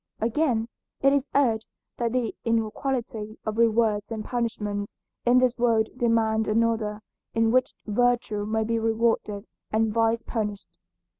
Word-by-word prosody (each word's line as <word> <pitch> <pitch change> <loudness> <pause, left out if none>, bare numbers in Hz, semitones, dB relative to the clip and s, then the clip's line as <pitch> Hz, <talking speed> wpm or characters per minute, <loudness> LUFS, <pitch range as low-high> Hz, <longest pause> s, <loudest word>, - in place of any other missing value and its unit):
Again, 230 -1 +1 0.3
it 275 0 +5
is 280 0 0
urged 230 -6 +2 0.3
that 235 -1 0
the 245 -2 -1
inequality 230 -1 -2
of 215 +1 -2
rewards 220 -2 +2
and 220 -2 -4
punishments 210 -4 -3 0.3
in 245 +1 +6
this 255 -1 +3
world 225 -2 +3
demand 225 -3 +2
another 220 -1 +1 0.3
in 225 0 +3
which 255 +1 +2
virtue 230 -1 +1
may 220 0 0
be 230 +1 0
rewarded 225 -2 0 0.3
and 220 0 +1
vice 230 0 +2
punished. 210 -3 -4
225 Hz, 135 wpm, -26 LUFS, 215-235 Hz, 0.3 s, in